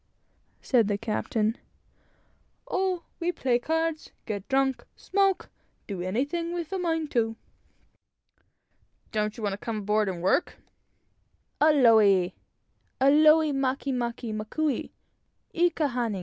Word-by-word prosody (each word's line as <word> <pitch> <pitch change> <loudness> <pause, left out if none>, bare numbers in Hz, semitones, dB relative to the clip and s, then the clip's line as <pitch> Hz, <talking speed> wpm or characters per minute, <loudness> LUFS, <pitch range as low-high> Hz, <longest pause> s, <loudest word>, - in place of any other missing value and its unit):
" - - -41
said 235 -6 +5
the 205 -1 0
captain. 220 +1 -1 1.1
"Oh, 370 -2 -1 0.2
we 345 +1 0
play 250 -7 0
cards, 320 +3 -2 0.2
get 205 -3 -5
drunk, 270 -1 +1
smoke 390 -1 0 0.3
do 195 -4 -5
anything 285 - -2
we're 340 -1 -2
a 385 - -2
mind 325 -3 -1
to." 225 -2 0 1.8
"Don't 215 0 -1
you 225 - -7
want 205 -1 0
to 200 - -6
come 230 -2 -3
aboard 210 0 +1
and 175 -2 -5
work?" 190 - +1 1.0
"Aole! 220 - +5 0.7
aole 305 +3 +5
make 270 0 -1
make 235 -2 -3
makou 250 +6 -2 0.6
i 350 +1 +3
ka 315 -2 -1
hana. 240 -6 -2
250 Hz, 120 wpm, -27 LUFS, 215-315 Hz, 1.8 s, said